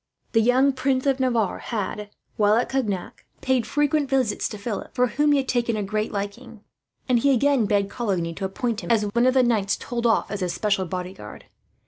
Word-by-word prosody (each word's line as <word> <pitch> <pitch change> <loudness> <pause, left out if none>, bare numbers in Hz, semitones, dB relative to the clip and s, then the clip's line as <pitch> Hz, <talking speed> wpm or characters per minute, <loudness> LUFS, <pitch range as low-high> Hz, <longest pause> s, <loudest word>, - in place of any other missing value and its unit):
The 225 - +3
young 260 +4 +3
Prince 260 0 0
of 275 -1 +2
Navarre 235 -6 0
had, 210 -2 -4 0.3
while 210 0 +3
at 235 - +1
Cognac, 215 -9 -3 0.2
paid 260 -3 +1
frequent 295 -1 +1
visits 255 -6 0
to 210 - -7
Philip, 205 +1 -5
for 250 -1 +3
whom 295 +5 +1
he 290 - +4
had 270 -1 -1
taken 235 -3 0
a 210 - -1
great 215 +2 -2
liking; 205 +2 -6 0.4
and 250 -2 +3
he 280 +4 +3
again 270 -3 +3
begged 200 0 +1
Coligny 185 -8 -2
to 195 +3 -4
appoint 225 +3 -2
him - - -7
as 225 -3 +3
one 235 +4 +1
of 255 - +2
the 260 - +5
knights 215 -5 +1
told 240 -1 -2
off 225 - +1
as 205 - -3
his 180 -2 -2
special 195 -1 0
bodyguard. 185 +2 -7
230 Hz, 205 wpm, -24 LUFS, 205-255 Hz, 0.4 s, the